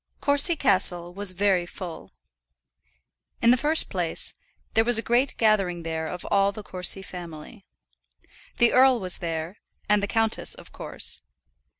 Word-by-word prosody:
Courcy 285 +4 +3
Castle 180 - +1
was 200 0 +2
very 185 -2 +1
full. 175 -2 -8 1.3
In 235 - +5
the - - +6
first 300 +5 +1
place, - - -3 0.4
there 225 - +4
was 240 0 +3
a 225 - 0
great 245 +3 +1
gathering 195 -6 +2
there 160 -1 -3
of 180 - -6
all 200 0 +3
the 210 +1 -9
Courcy 185 0 0
family. 175 +3 -10 0.9
The 235 - +4
earl 260 -1 +5
was 185 -2 -4
there, 165 +2 -4 0.3
and 210 0 +3
the 200 - -1
countess, 225 0 0
of - - -13
course. - - -6
200 Hz, 145 wpm, -25 LUFS, 175-235 Hz, 1.3 s, the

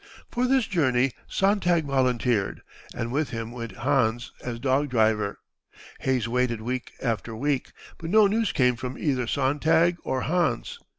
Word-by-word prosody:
For 250 +1 +1
this 260 -2 +3
journey 135 -8 +2 0.2
Sontag 180 -5 +2
volunteered, 125 -6 0 0.3
and 115 0 -3
with 145 +3 0
him 115 -3 -5
went 115 -1 -6
Hans 120 -2 0
as 120 -2 -4
dog 135 +3 +1
driver. 110 -4 +1 0.6
Hayes 130 -4 0
waited 120 -1 0
week 125 +3 -4
after 115 -2 -2
week, 140 +3 -1 0.3
but 165 - -5
no 215 +2 +6
news 215 +1 +1
came 125 -2 +3
from 130 +1 -6
either 130 -5 0
Sontag 155 +6 +2
or 130 - -1
Hans. 155 -6 -1
130 Hz, 145 wpm, -26 LUFS, 120-155 Hz, 0.6 s, no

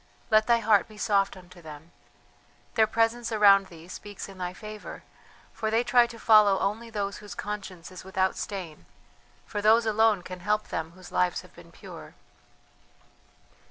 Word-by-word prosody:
Let 215 0 +4
thy 235 -1 +5
heart 215 -3 +3
be 215 - -15
soft 200 -2 +1
unto 180 -1 -15
them. 155 +1 -12 0.8
Their 220 -1 +4
presence 230 +1 0
around 200 -3 +5
thee 165 -2 -14
speaks 205 +2 -8
in 195 -1 -13
thy 180 -1 -3
favour, 215 +2 -9 0.5
for 220 - -2
they 225 +2 +2
try 245 0 +4
to 235 - -11
follow 215 -3 +5
only 215 +5 -2
those 200 -2 -3
whose 210 -1 -10
conscience 190 -4 -6
is 185 - -10
without 190 0 0
stain, 185 -7 -6 0.6
for 205 - -4
those 225 +2 +5
alone 220 -3 +3
can 185 0 -8
help 210 +3 -1
them 160 +1 -4
whose 185 0 -14
lives 180 -1 +1
have - - -18
been - - -16
pure." - - -12
205 Hz, 165 wpm, -27 LUFS, 185-220 Hz, 0.8 s, thy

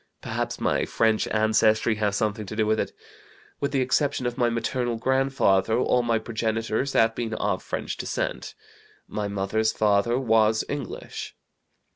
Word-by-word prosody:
Perhaps - - -3
my - - +1
French 110 -1 +1
ancestry 110 +1 +3
has 105 -2 0
something 105 0 -1
to 110 - -6
do 110 0 +1
with 110 0 +1
it. - - -1 0.7
With 140 0 -1
the 135 -2 +1
exception 135 +1 +1
of 120 0 -1
my 120 -2 +2
maternal 120 +1 -1
grandfather, 125 -5 +2
all 125 0 +2
my 115 -1 +1
progenitors 110 +3 -2
have 115 0 +4
been 115 -1 -3
of 100 -3 -1
French - - -4
descent. - - -3 0.5
My 105 -1 -3
mother's 100 +2 0
father 105 +3 +2
was 110 -3 +3
English. 145 -3 -6
110 Hz, 150 wpm, -25 LUFS, 110-120 Hz, 0.7 s, have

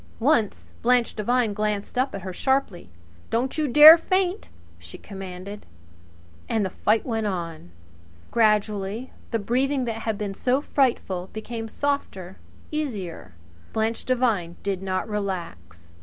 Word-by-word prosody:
Once 235 -4 +1
Blanche 245 0 +2
Devine 230 0 +1
glanced 210 +1 -2
up 255 0 0
at 195 - -6
her 185 -1 -5
sharply. 265 - -1 0.4
"Don't 250 +3 -1
you 305 - +1
dare 300 +5 +10
faint!" 370 +3 0 0.3
she 85 0 -11
commanded. 195 +1 -8 0.9
And 220 -3 +1
the 190 - -3
fight 215 +3 +1
went 225 -3 -1
on. 170 - -5 0.6
Gradually 210 +1 +1 0.2
the 230 - 0
breathing 255 +5 0
that 230 -2 -3
had 220 -2 -2
been 205 -1 -3
so 255 +6 +1
frightful 230 -11 0
became 225 +1 -5
softer, 215 -9 -3 0.3
easier. 200 - -4 0.4
Blanche 220 +1 -1
Devine 225 -10 0
did 195 -2 -2
not 190 +1 -2
relax. 165 - -5
215 Hz, 130 wpm, -24 LUFS, 190-250 Hz, 0.9 s, dare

